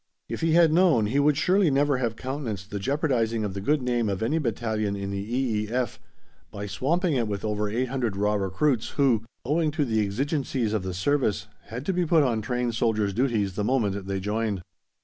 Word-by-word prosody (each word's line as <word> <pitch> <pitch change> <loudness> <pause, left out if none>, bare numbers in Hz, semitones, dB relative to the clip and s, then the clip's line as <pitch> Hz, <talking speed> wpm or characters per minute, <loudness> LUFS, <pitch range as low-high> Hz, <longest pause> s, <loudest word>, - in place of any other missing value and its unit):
If - - -5
he 165 -1 +2
had 165 -2 +5
known 165 - +4
he 125 +7 +1
would 145 0 +3
surely 185 +3 +3
never 140 0 +2
have 120 -3 -1
countenanced 115 -7 -5
the 100 - -3
jeopardising 120 -3 0
of 100 -2 -3
the 100 - -5
good 145 +6 +1
name 120 -3 0
of 100 +2 -2
any 150 +8 +1
battalion 110 -5 -1
in 100 0 -4
the 100 - -3
E.E.F. 115 +1 -1 0.5
by 100 0 -6
swamping 155 - 0
it 120 -4 +1
with 100 -1 -3
over 105 -1 -1
800 120 -2 -1
raw 105 +1 +1
recruits 105 +6 0
who, 130 -6 +3 0.2
owing 155 +4 +1
to 150 -1 0
the 110 -3 +1
"exigencies 130 +1 -1
of 110 - 0
the 95 -1 -4
service," 105 -2 0 0.2
had 120 +6 -7
to 190 - 0
be 180 0 +1
put 160 -1 +5
on 115 -5 +1
trained 125 +2 -1
soldiers' 110 -3 +1
duties 110 -5 0
the 105 - -2
moment 100 -5 0
they 100 -1 -2
joined. 105 -1 -2
115 Hz, 200 wpm, -26 LUFS, 105-140 Hz, 0.5 s, had